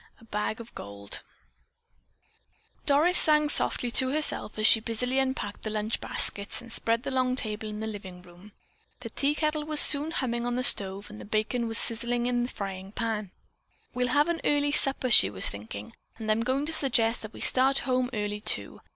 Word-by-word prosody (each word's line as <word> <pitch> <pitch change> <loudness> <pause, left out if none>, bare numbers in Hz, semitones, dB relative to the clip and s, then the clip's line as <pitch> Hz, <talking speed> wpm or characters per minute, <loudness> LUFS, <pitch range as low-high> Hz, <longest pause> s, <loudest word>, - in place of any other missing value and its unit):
A - - -21
BAG 215 +1 -4
OF 230 0 -12
GOLD 100 0 -8 1.7
Doris 310 +6 +3
sang 300 -1 +4
softly 245 -4 +5
to 260 +2 +2
herself 295 -7 0
as 215 - -2
she 225 - +6
busily 250 +4 -3
unpacked 260 -6 -4
the 215 - -5
lunch 215 +1 -4
baskets 200 0 +2
and 235 -1 -10
spread 230 +1 +1
the 275 - -5
long 255 -1 -1
table 215 -3 -5
in 210 0 -8
the - - -4
living 190 -4 -9
room. 180 +4 -18 0.5
The 230 -2 -9
tea 285 +5 -1
kettle 305 -1 -2
was 305 0 +4
soon 290 +2 +8
humming 240 -7 -3
on 245 - -3
the 255 - -2
stove 200 -2 +1
and 210 0 -12
bacon 225 +2 -2
was 225 0 +2
sizzling 235 +1 -1
in 245 0 -1
the 240 - -3
frying 195 -2 -8
pan. 220 -4 -4 0.6
"We'll 250 0 -2
have 290 +5 +1
an 340 -1 -3
early 290 0 0
supper," 270 -3 +1
she 95 - +7
was 95 -2 +1
thinking, 105 0 -10 0.2
"and 220 -1 -4
I'm 215 +1 0
going 260 +4 -2
to 325 - -4
suggest 235 -6 0
that 215 0 -11
we - - -12
start 265 +1 +2
home 255 0 0
early, 210 -2 -5
too. - - -4
235 Hz, 195 wpm, -26 LUFS, 210-265 Hz, 1.7 s, soon